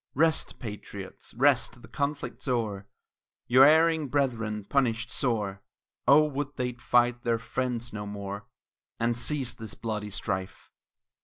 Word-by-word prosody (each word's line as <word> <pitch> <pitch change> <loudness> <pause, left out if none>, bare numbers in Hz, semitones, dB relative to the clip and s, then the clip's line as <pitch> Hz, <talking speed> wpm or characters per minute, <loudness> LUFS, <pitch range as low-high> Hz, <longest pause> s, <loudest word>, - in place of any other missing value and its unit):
Rest, 160 +2 +2
patriots, 105 -4 -8
rest; 125 -2 +2
the - - -11
conflict's 140 +4 -3
o'er, 105 -6 -1 0.6
Your 130 +2 +7
erring 160 0 +4
brethren 115 -6 0
punished 115 0 0
sore; 105 -6 -1 0.5
Oh, 140 +4 +8
would 145 -1 -3
they'd 125 -1 -3
fight 120 0 +3
their 115 -1 +1
friends 120 0 -3
no 105 -1 -5
more, 100 0 -6 0.5
And 115 +1 +1
cease 130 0 -1
this 110 -1 -8
bloody 105 -2 -3
strife. 95 -1 -4
120 Hz, 130 wpm, -28 LUFS, 105-135 Hz, 0.6 s, Oh